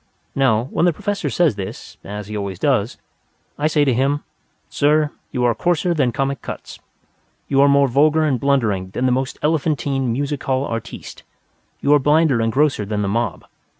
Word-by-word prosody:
Now, 120 Hz, -5 st, +2 dB
when -, -, +1 dB
the 175 Hz, -, +3 dB
Professor 205 Hz, +6 st, -3 dB
says 170 Hz, -7 st, +2 dB
this 95 Hz, -2 st, -8 dB
(as 105 Hz, +1 st, -6 dB
he 105 Hz, +2 st, -7 dB
always 100 Hz, -3 st, -4 dB
does), -, -, 0 dB, 0.6 s
I 150 Hz, -, +2 dB
say 150 Hz, -2 st, +2 dB
to 135 Hz, -, +2 dB
him, 140 Hz, +4 st, 0 dB, 0.4 s
"Sir, 150 Hz, +1 st, +2 dB, 0.2 s
you 125 Hz, -2 st, -1 dB
are 120 Hz, -1 st, +3 dB
coarser 175 Hz, +2 st, 0 dB
than 135 Hz, -7 st, +1 dB
Comic 135 Hz, 0 st, -2 dB
Cuts. -, -, -8 dB, 0.7 s
You 135 Hz, 0 st, +3 dB
are 140 Hz, -, +5 dB
more 140 Hz, 0 st, +4 dB
vulgar 150 Hz, +5 st, +3 dB
and 140 Hz, -5 st, +1 dB
blundering 110 Hz, -9 st, 0 dB
than 130 Hz, -, 0 dB
the 130 Hz, -, +3 dB
most 130 Hz, +2 st, -1 dB
elephantine 140 Hz, -4 st, 0 dB
music 140 Hz, +3 st, -2 dB
hall 135 Hz, 0 st, 0 dB
artiste. 115 Hz, -3 st, -7 dB, 0.6 s
You 145 Hz, -, +3 dB
are 145 Hz, -, +6 dB
blinder 145 Hz, -3 st, +3 dB
and 115 Hz, 0 st, +1 dB
grosser 140 Hz, -3 st, +1 dB
than 105 Hz, 0 st, -2 dB
the -, -, -1 dB
mob. 110 Hz, -2 st, -2 dB
135 Hz, 185 wpm, -20 LUFS, 115-150 Hz, 0.7 s, are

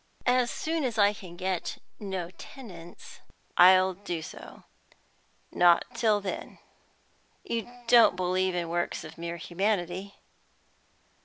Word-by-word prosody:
As 250 Hz, -1 st, +3 dB
soon 320 Hz, -1 st, -2 dB
as 240 Hz, -3 st, -2 dB
I 205 Hz, -1 st, +5 dB
can 185 Hz, -4 st, -11 dB
get 185 Hz, -1 st, -3 dB, 0.2 s
no 190 Hz, -4 st, -4 dB
tenants 180 Hz, -7 st, -12 dB, 0.4 s
I'll 185 Hz, +1 st, +7 dB
do 175 Hz, -4 st, -5 dB
so; -, -, -11 dB, 0.9 s
not 175 Hz, -1 st, +5 dB
till 225 Hz, -3 st, +2 dB
then." 195 Hz, -2 st, -6 dB, 0.9 s
"You 230 Hz, 0 st, -3 dB, 0.2 s
don't 235 Hz, -5 st, +6 dB
believe 185 Hz, 0 st, 0 dB
in 175 Hz, -1 st, -1 dB
works 175 Hz, +1 st, -2 dB
of 160 Hz, +1 st, -11 dB
mere 170 Hz, 0 st, -4 dB
humanity?" 185 Hz, +2 st, -2 dB
185 Hz, 115 wpm, -28 LUFS, 175-215 Hz, 0.9 s, I'll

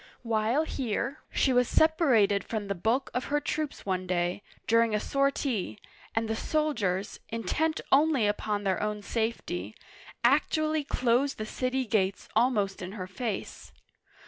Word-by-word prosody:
While 230 Hz, +5 st, +1 dB
here, 265 Hz, -1 st, -2 dB
she 265 Hz, -, +2 dB
was 250 Hz, -1 st, +3 dB
sepa 315 Hz, 0 st, +4 dB
rated 200 Hz, -4 st, +4 dB
from 215 Hz, -2 st, -3 dB
the 200 Hz, -, -1 dB
bulk 225 Hz, +9 st, 0 dB
of 250 Hz, -, -1 dB
her 295 Hz, +1 st, +1 dB
troops 305 Hz, 0 st, -3 dB
one 185 Hz, -1 st, -1 dB
day, 175 Hz, +1 st, 0 dB, 0.2 s
during 230 Hz, -1 st, +3 dB
a -, -, +1 dB
sortie, 275 Hz, -, 0 dB, 0.4 s
and 225 Hz, 0 st, +1 dB
the 220 Hz, -, -1 dB
soldiers, 220 Hz, -, -1 dB
intent 310 Hz, +8 st, -1 dB
only 280 Hz, -4 st, +4 dB
upon 205 Hz, 0 st, -1 dB
their 190 Hz, -2 st, 0 dB
own 210 Hz, 0 st, -2 dB
safety, 200 Hz, -, -3 dB, 0.5 s
actually 310 Hz, +4 st, +2 dB
closed 255 Hz, +1 st, +1 dB
the 215 Hz, -, -4 dB
city 255 Hz, +3 st, -1 dB
gates 200 Hz, -3 st, 0 dB
almost 215 Hz, -5 st, +2 dB
in 185 Hz, +1 st, -6 dB
her 190 Hz, -4 st, -5 dB
face. 200 Hz, +3 st, -5 dB
230 Hz, 145 wpm, -29 LUFS, 205-275 Hz, 0.5 s, sepa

